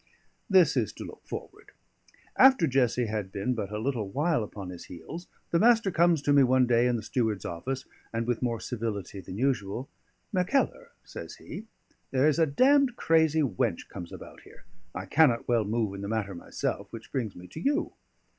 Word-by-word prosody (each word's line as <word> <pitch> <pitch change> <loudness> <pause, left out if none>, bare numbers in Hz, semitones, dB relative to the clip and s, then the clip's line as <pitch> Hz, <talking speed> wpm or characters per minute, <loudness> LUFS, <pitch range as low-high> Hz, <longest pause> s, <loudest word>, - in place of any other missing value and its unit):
This 180 -7 +5
is 115 -6 +1
to - - -8
look - - -11
forward. - - -8 0.6
After 260 -9 +6
Jessie 125 -3 +2
had 105 -3 -3
been 100 +5 -1
but 105 -5 -3
a 105 - -3
little 115 -3 -2
while 150 - +1
upon 100 -2 -7
his 90 - -9
heels, 160 - -9 0.2
the 170 - +3
Master 225 -2 +4
comes 170 -3 +3
to 145 - +3
me 140 - +7
one 130 0 +4
day 120 0 +3
in 125 - +1
the 110 - -3
steward's 110 -4 -1
office, 130 +11 -4 0.3
and 115 0 -2
with 120 -1 -1
more 120 -3 -1
civility 105 -3 -4
than 90 - -8
usual, 125 -1 -1 0.4
"Mackellar," 185 +9 0
says - - -8
he, 220 - -9 0.4
"there 135 +2 +3
is 155 +1 +2
a 165 - +4
damned 260 - +4
crazy 160 -5 +3
wench 115 -10 -1
comes 85 -1 -8
about - - -11
here. - - -17 0.3
I 95 - -4
cannot 125 +1 +3
well 115 -3 +2
move 110 -1 -1
in 100 - -6
the 100 - -4
matter 105 -2 -2
myself, 85 - -4
which 115 0 -10
brings 120 -8 -2
me 90 - -11
to - - -8
you. 280 - 0
125 Hz, 190 wpm, -28 LUFS, 105-160 Hz, 0.6 s, me